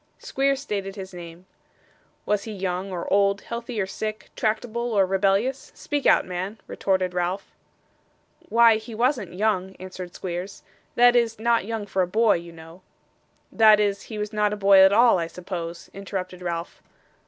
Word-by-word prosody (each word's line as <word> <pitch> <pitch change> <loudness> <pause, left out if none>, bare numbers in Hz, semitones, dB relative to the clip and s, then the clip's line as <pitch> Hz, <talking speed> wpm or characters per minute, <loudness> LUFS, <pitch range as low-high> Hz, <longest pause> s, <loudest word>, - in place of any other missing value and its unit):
Squeers 275 0 0
stated 200 -8 -4
his 190 -2 -8
name. 170 0 -10 0.8
'Was 205 -1 0
he 220 - -6
young 190 -1 -3
or 175 -2 -4
old, 200 0 +3
healthy 235 -1 -5
or 195 - +1
sickly, 215 +2 -6
tractable 235 +2 -2
or 195 -2 +4
rebellious? 195 +7 0
Speak 290 -2 -2
out, - - +5
man,' 185 +4 -5
retorted 185 -2 -1
Ralph. 180 +2 -2 1.0
'Why, 230 0 +6
he 220 +1 -9
wasn't 240 - 0
young,' 190 -2 0
answered 185 -1 -8
Squeers; 180 +2 -6 0.3
'that 245 0 +6
is, 230 -2 +2
not 235 -2 +2
young 225 -1 -4
for 195 -1 -1
a 180 - +1
boy, 220 +2 +3
you 170 0 -10
know.' 165 +2 -14 0.7
'That 215 -1 +6
is, 200 -1 0
he 220 - -6
was 210 +1 -4
not 210 -1 +1
a - - -4
boy 195 -1 +6
at 190 0 +7
all, 230 -2 +5
I 165 - -2
suppose?' 170 -1 -7
interrupted 185 -2 -6
Ralph. 170 -1 -5
200 Hz, 165 wpm, -24 LUFS, 185-220 Hz, 1.0 s, at